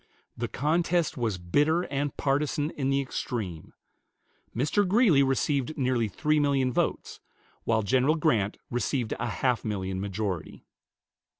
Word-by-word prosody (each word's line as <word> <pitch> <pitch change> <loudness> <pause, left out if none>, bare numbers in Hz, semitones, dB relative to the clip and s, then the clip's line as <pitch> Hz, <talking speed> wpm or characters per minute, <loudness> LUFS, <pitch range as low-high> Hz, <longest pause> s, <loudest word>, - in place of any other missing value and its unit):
The - - -3
contest 165 +3 0
was 115 -7 -1
bitter 150 - +2
and 140 -2 -3
partisan 145 +2 0
in 135 -2 -2
the 135 0 +2
extreme. 105 - -5 0.8
Mr. 140 - +2
Greeley 195 - +5
received 135 +1 0
nearly 125 -4 +1
three 150 +9 +1
million 135 -3 +1
votes, - - -1 0.5
while 110 -1 +2
General 130 +9 +3
Grant 115 -11 +1
received 120 -1 -1
a - - -1
half 120 +2 0
million 95 -3 -3
majority. 95 -4 -4
135 Hz, 125 wpm, -27 LUFS, 110-150 Hz, 0.8 s, Greeley